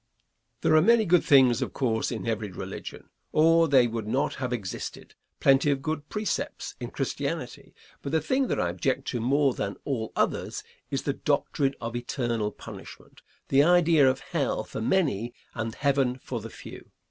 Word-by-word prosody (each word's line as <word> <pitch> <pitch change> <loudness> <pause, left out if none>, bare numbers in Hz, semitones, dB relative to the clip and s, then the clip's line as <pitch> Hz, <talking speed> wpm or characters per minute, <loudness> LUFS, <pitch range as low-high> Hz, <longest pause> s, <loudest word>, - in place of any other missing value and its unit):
Answer. - - -48
There - - +5
are - - +6
many 225 +4 +5
good 180 -1 +4
things, 130 -3 +5
of 130 - -3
course, 115 -5 0
in 115 - -4
every 110 -2 -2
religion, - - -8 0.2
or 165 +1 +5
they 135 -4 +5
would 115 -2 -3
not 135 +6 0
have 130 -2 -4
existed; 105 -7 -5 0.3
plenty 135 +2 +4
of 135 -1 0
good 155 -1 -3
precepts 210 -2 -3
in - - -5
Christianity, - - -4 0.3
but 140 - -5
the 160 - +3
thing 260 - 0
that - - -1
I 90 - +1
object 130 +9 -1
to 120 - -2
more 135 +2 +2
than 100 - -4
all 115 -6 -2
others - - -1 0.3
is - - -2
the - - 0
doctrine 135 -1 0
of 115 0 -5
eternal 120 -3 -2
punishment, - - -12 0.3
the 135 - +5
idea 165 -3 +5
of 130 +1 -2
hell 155 -10 -1
for 110 - -7
many 120 - 0 0.2
and 115 -1 -4
heaven 135 -3 +1
for 125 -2 -5
the 115 - -8
few. - - -11
135 Hz, 180 wpm, -27 LUFS, 115-155 Hz, 0.3 s, are